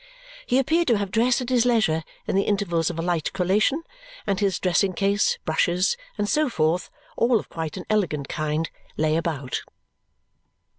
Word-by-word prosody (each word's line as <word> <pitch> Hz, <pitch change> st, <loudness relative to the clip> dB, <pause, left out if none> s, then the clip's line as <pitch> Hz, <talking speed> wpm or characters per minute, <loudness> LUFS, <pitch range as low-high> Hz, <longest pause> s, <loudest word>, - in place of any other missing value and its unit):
He 250 Hz, -, +3 dB
appeared 320 Hz, +6 st, +2 dB
to 235 Hz, -4 st, +4 dB
have 200 Hz, -2 st, -3 dB
dressed 240 Hz, +4 st, +2 dB
at 250 Hz, -, -4 dB
his 250 Hz, -2 st, +3 dB
leisure 215 Hz, -10 st, +2 dB, 0.2 s
in -, -, -1 dB
the 195 Hz, -, +4 dB
intervals 195 Hz, -6 st, 0 dB
of 170 Hz, -, -5 dB
a 165 Hz, -, -2 dB
light 170 Hz, -3 st, 0 dB
collation, 205 Hz, -, +1 dB, 0.4 s
and 195 Hz, -2 st, 0 dB
his 195 Hz, -4 st, +1 dB
dressing 185 Hz, +1 st, +1 dB
case, 200 Hz, +2 st, +1 dB
brushes, 175 Hz, -, +2 dB, 0.2 s
and 205 Hz, -, 0 dB
so 300 Hz, +5 st, +2 dB
forth, 165 Hz, -3 st, 0 dB, 0.3 s
all 235 Hz, -1 st, +3 dB
of -, -, -10 dB
quite 160 Hz, +1 st, -5 dB
an 180 Hz, -, -6 dB
elegant 175 Hz, -10 st, 0 dB
kind, 155 Hz, +1 st, -2 dB, 0.3 s
lay 155 Hz, 0 st, +2 dB
about. 155 Hz, -6 st, -2 dB
190 Hz, 170 wpm, -24 LUFS, 165-225 Hz, 0.4 s, to